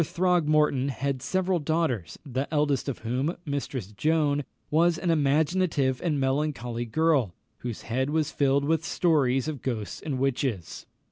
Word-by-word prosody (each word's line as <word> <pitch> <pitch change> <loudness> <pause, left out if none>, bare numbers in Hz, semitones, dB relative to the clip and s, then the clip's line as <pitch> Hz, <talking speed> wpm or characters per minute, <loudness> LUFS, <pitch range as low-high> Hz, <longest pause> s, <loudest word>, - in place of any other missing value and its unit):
Throgmorton 155 -5 +2
had 135 +1 -2
several 185 +6 0
daughters, 150 - -1
the 135 +1 -3
eldest 145 -3 +1
of 135 - -3
whom, 130 +8 -1
Mistress 135 - -4
Joan, 145 +4 +1 0.3
was 165 +2 +3
an 175 0 0
imaginative 150 -2 +2
and 155 -5 0
melancholy 130 -4 -1
girl, 135 - +1 0.2
whose 120 -3 -5
head 130 +4 -1
was 155 0 0
filled 140 -1 +2
with 160 +2 +1
stories 140 -7 +2
of 150 -4 -4
ghosts 110 -6 -4
and 145 -4 -3
witches. 130 - -2
140 Hz, 140 wpm, -27 LUFS, 130-160 Hz, 0.3 s, was